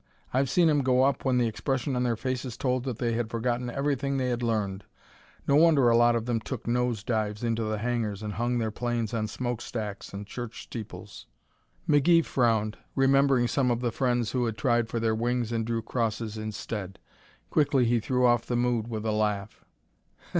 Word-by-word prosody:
I've 130 +1 +2
seen 175 -2 +4
'em 150 -2 +3
go 130 -1 +3
up 135 0 +1
when 130 -1 +2
the 120 - +3
expression 130 +4 -2
on 125 - 0
their 120 -2 +1
faces 130 0 -4
told 125 -1 -1
that 125 -5 -3
they 120 -1 0
had 115 -1 -1
forgotten 120 +1 -1
everything 140 +1 -1
they 130 -1 0
had 120 0 -1
learned. 105 -4 -1 0.6
No 140 - +4
wonder 150 -5 +5
a 115 - +4
lot 120 0 +5
of 115 -1 -1
them 120 -2 0
took 120 +1 -6
nose 120 -2 0
dives 110 -1 -2
into 115 -1 0
the 110 0 -1
hangars 110 -2 -2
and 105 -1 -4
hung 120 +3 0
their 110 -2 -1
planes 120 -1 -2
on 110 -2 -1
smokestacks 110 -2 -4
and 100 +1 -6
church 120 +2 -7
steeples." 100 -3 -9 0.6
McGee 165 +3 +4
frowned, 110 -4 +1 0.2
remembering 135 -2 +4
some 130 0 +1
of 120 0 0
the 120 -2 0
friends 120 -2 0
who 125 -2 0
had 110 -2 -3
tried 120 -3 +1
for 115 - -2
their 110 -1 +1
wings 120 +1 -1
and 115 -1 -1
drew 115 -1 -1
crosses 115 -2 -2
instead. 105 -2 -5 0.5
Quickly 145 -4 +3
he 120 0 +2
threw 125 +3 +1
off 120 -1 +3
the 120 - -1
mood 120 -2 0
with 110 -2 -4
a 110 - +1
laugh. 105 -1 -2
120 Hz, 195 wpm, -27 LUFS, 110-125 Hz, 0.6 s, wonder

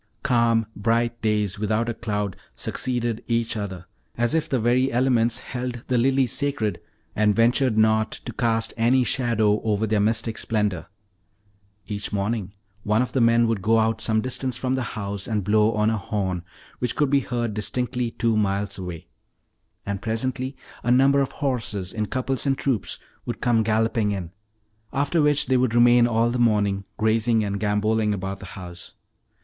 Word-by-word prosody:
Calm, 115 -2 +3
bright 115 +2 0
days 105 -3 0
without 110 +2 0
a 120 - -1
cloud 105 -4 -3 0.2
succeeded 120 -3 -2
each 115 -1 0
other, 95 -4 -5 0.3
as 120 0 +1
if 160 -1 0
the 130 - +1
very 125 +4 +2
elements 120 -2 +2
held 125 -2 -5
the 125 - +2
lilies 130 0 +2
sacred 130 -6 -1 0.3
and 105 -1 +3
ventured 120 0 +3
not 110 0 +3
to - - -6
cast 115 -1 0
any 125 +3 +3
shadow 110 -4 +1
over 110 -1 0
their 110 -1 +1
mystic 110 +1 0
splendor. 105 -6 -1 1.0
Each 105 -1 -4
morning 100 -1 -2 0.3
one 105 +4 +2
of 125 - -6
the 130 - +2
men 115 0 +4
would 115 -3 0
go 110 +3 +3
out 110 0 +1
some 110 -1 +1
distance 130 0 -2
from 130 0 -1
the 130 - 0 0.2
house 100 -1 -4
and 105 -3 -1
blow 105 +3 +3
on 105 +1 +2
a 110 - -1
horn, 95 -3 -2 0.4
which 125 -2 -1
could 145 -2 +1
be 140 - +5
heard 120 -3 -2
distinctly 125 +3 -2
two 115 0 0
miles 100 -1 0
away; 90 -3 -7 0.8
and 100 -1 -3
presently 130 +4 -2 0.2
a 120 - -2
number 135 +3 +5
of 135 - -1
horses, 115 -9 -2
in 105 -1 -2
couples 130 +3 -1
and 135 -1 +2
troops, 130 -7 -1 0.3
would - - -4
come 120 -2 +2
galloping 110 0 +1
in, 90 -4 -5 0.6
after 145 +4 +1
which 150 -1 +3
they 130 - +2
would 125 -2 +1
remain 120 0 +6
all 115 0 +2
the 125 - -2
morning 100 -4 +2
grazing 110 +1 +2
and 100 -1 -2
gamboling 105 +1 +1
about 95 0 -5
the - - -9
house. 90 -2 -9
115 Hz, 170 wpm, -24 LUFS, 105-125 Hz, 1.0 s, remain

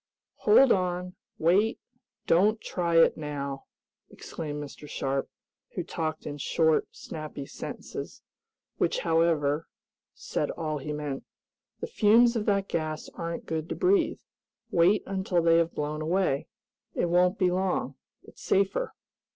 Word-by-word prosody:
"Hold 270 - +6
on! 180 -1 0 0.2
Wait! 195 +7 +3 0.5
Don't 210 +6 +4
try 170 -5 0
it 165 - +5
now!" 140 -2 -5 0.4
exclaimed 150 -2 -6
Mr. 145 +1 -10
Sharp, 135 0 -2 0.5
who - - -2
talked 155 -1 -4
in 145 -1 -5
short, 160 +2 +2
snappy 155 -3 -7
sentences, - - -7 0.5
which, - - +1
however, 160 -2 +2 0.5
said - - -2
all 155 -2 -3
he 150 +2 -5
meant. 150 -2 -4 0.6
"The - - -1
fumes 235 +3 +4
of 215 -2 -1
that 200 -1 +2
gas 155 -1 -3
aren't 170 -2 -5
good 160 0 -3
to - - -2
breathe. 365 -3 +2 0.5
Wait, 180 +5 +4
until 190 -2 0
they 165 0 +5
have 170 0 +1
blown 150 +1 -2
away. 165 -3 0 0.5
It - - +1
won't 180 +3 +3
be 185 -2 +2
long. 185 0 0 0.3
It's - - -16
safer." 200 - +1
165 Hz, 135 wpm, -28 LUFS, 150-190 Hz, 0.6 s, Hold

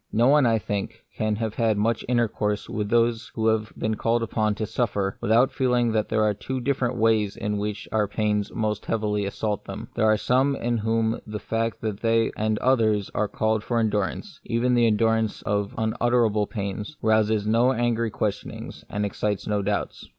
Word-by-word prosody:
No 120 +4 +3
one, 145 -3 +5
I 115 -1 +3
think,* 100 -2 -4
can 110 -1 0
have 110 0 -3
had 110 -2 +1
much 110 +2 0
intercourse 110 -4 0
with 105 -1 -3
those 115 +1 +1
who 110 - -1
have 110 -1 0
been 110 - -1
called 115 +2 0
upon 110 -2 0
to 110 - -2
suffer, 105 -3 -1
without 115 +4 +3
feel 130 -2 +1
ing 120 -1 +2
that 110 -1 0
there 110 0 +2
are 105 -1 +2
two 130 +6 -4
different 125 -1 0
ways 110 -3 +2
in 105 0 -2
which 105 -1 -4
their 105 -2 +1
pains 105 0 -1
most 105 -2 -2
heavily 105 -2 0
assault 105 +1 -3
them. - - -7
There 110 - +2
are 110 0 +4
some 130 +5 +2
in 120 -2 -1
whom 110 +1 0
the 105 0 -4
fact 115 +1 -2
that 110 -3 -3
they 115 0 +2
and 110 0 0
others 110 -6 +2
are 105 - 0
called 110 +1 0
on - - -18
for 120 - 0
endurance 110 - -1
— - - -37
even 125 +2 +1
the 120 -1 +4
endurance 110 0 +1
of 100 -1 -1
unutterable 110 -1 +1
pains 105 +6 -5
— - - -40
rouses 110 -1 +2
no 115 +4 +3
angry 120 -2 0
questionings, 105 -1 -4
and 105 0 -1
excites 105 0 -2
no 105 -1 0
doubts. 100 +1 -3
110 Hz, 200 wpm, -25 LUFS, 105-115 Hz, -, one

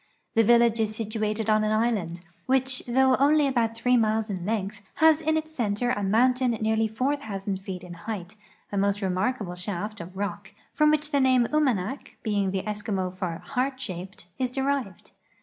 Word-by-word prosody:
The 225 - +4
village 235 0 +4
is 215 -1 0
situated 215 0 -2
on 215 0 +3
an 215 - +1
island, 215 -7 0 0.3
which 260 0 +1
though 260 +1 +4
only 295 +2 +4
about 235 -4 +1
three 250 +2 +2
miles 220 -1 +1
in 185 -1 -4
length, 210 -2 -2
has 315 0 +5
in 315 0 +1
its 315 0 -4
center 235 0 0
a 250 - -1
moun 225 +6 +4
tain 255 0 0
nearly 220 0 +1
4,000 220 -5 -2
feet 185 -1 -7
in 180 -1 -9
height, 200 -1 -6 0.4
a 205 - -2
most 200 +1 +1
remarkable 190 +1 -1
shaft 200 +3 -5
of 180 +3 -10
rock, 205 0 -5 0.2
from 300 0 +4
which 300 0 +1
the 280 - +3
name 255 -2 +4
Umanak, 265 -5 0
being 205 -3 0
the 190 0 -2
Eskimo 205 -3 -3
for 180 -2 -4
" - - -19
heart 260 0 -1
shaped," 185 -6 -7
is 255 -1 0
derived. 265 -6 -2
220 Hz, 185 wpm, -26 LUFS, 195-255 Hz, 0.4 s, has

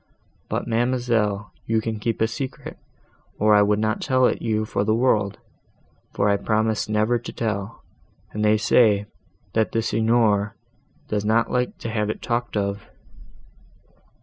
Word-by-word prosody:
But, - - -2
ma'amselle, 115 -4 0 0.2
you 115 0 +2
can 110 -1 -3
keep 115 +1 -2
a 110 - +4
secret, 130 +3 -6 0.6
or 105 +1 +4
I 105 - +6
would 105 0 +3
not 110 0 -1
tell 130 -1 +2
it - - +1
you 110 -1 0
for 100 - -1
the 110 +1 +2
world; 110 -5 +1 0.8
for 100 - +2
I 100 0 +3
promised 110 0 0
never 110 +3 +1
to 120 - -8
tell, 105 -1 -4 0.5
and 105 - -3
they 105 0 +4
say, 105 -1 +3 0.5
that 110 -1 +1
the 115 - +1
Signor 110 -3 +2 0.5
does 105 -1 -1
not 115 +2 +2
like 125 0 -1
to 115 - -5
have 105 -1 -1
it 110 - -3
talked 120 -2 -2
of." 100 0 -3
110 Hz, 155 wpm, -23 LUFS, 105-115 Hz, 0.8 s, I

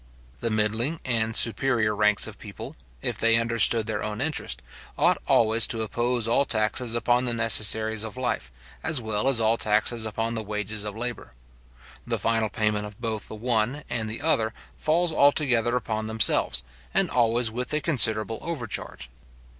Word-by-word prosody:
The 115 - -1
middling 110 +8 -1
and 115 -3 0
superior 115 -3 +2
ranks 105 0 +3
of 110 -2 -9
people, 100 -4 -9 0.3
if - - -2
they 115 0 +4
understood 115 -1 +2
their 110 - -3
own 105 0 -4
interest, 135 - -3 0.3
ought - - +3
always 115 0 +3
to 115 -1 -2
oppose 120 +2 -1
all 120 +4 +3
taxes 115 0 -1
upon 120 +1 +1
the 120 -1 -1
necessaries 110 -1 +3
of 110 +2 -7
life, 130 -1 -3 0.3
as 160 -4 +1
well 110 +1 -2
as 135 -4 +3
all 115 +1 +2
taxes 110 +2 +1
upon 115 +2 -3
the 110 - -3
wages 105 0 -4
of 105 0 -5
labour. 120 - -5 0.7
The - - -1
final 115 -1 0
payment 105 -1 -1
of 105 -1 -13
both 110 -3 -4
the - - -8
one 120 +5 -1
and 115 -2 -2
the 115 +6 -6
other 110 -9 +2 0.2
falls 165 +2 +1
altogether 130 -5 +3
upon 110 -3 -2
themselves, 110 - +3 0.3
and 195 -1 +3
always 120 -1 +2
with 125 +2 -4
a 150 - +1
considerable 115 - +3
overcharge. 120 - -6
115 Hz, 165 wpm, -25 LUFS, 110-120 Hz, 0.7 s, they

